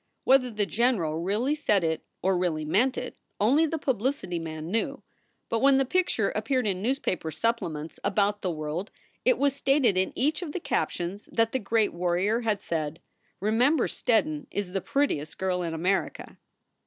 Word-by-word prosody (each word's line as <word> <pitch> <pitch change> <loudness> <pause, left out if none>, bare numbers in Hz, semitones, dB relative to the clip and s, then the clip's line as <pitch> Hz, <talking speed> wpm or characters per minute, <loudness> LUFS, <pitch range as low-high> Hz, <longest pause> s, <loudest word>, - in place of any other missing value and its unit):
Whether 260 -1 +4
the 210 -3 -1
general 200 -9 +1
really 215 - 0
said 210 - +1
it 160 -1 -1 0.2
or 190 0 +3
really 170 -4 0
meant 240 +11 +2
it, - - -5 0.2
only 280 +10 +4
the 325 - -2
publicity 260 - -1
man 160 0 -6
knew, 225 +1 -1 0.4
but 230 - 0
when 275 +1 +5
the 270 - +3
picture 365 +6 +1
appeared 255 -3 0
in 190 -3 -1
newspaper 215 - -1
supplements 165 -6 -2
about 205 +1 +1
the 185 - -1
world 155 +4 -4 0.4
it - - +4
was 280 -1 +2
stated 275 -7 +3
in 190 - +1
each 300 +6 +1
of 315 -5 -5
the - - -2
captions 190 - -2
that 230 0 +2
the 260 - 0
great 220 0 +1
warrior 180 +6 +1
had 215 -3 -1
said, 160 -1 -3 0.4
"Remem 240 +9 +3
ber 250 - +2
Steddon 285 +4 0
is 200 -3 -3
the 195 0 -1
prettiest 160 - -1
girl 185 -1 0
in 165 -2 -3
America." 185 +4 -1
210 Hz, 175 wpm, -27 LUFS, 175-265 Hz, 0.4 s, when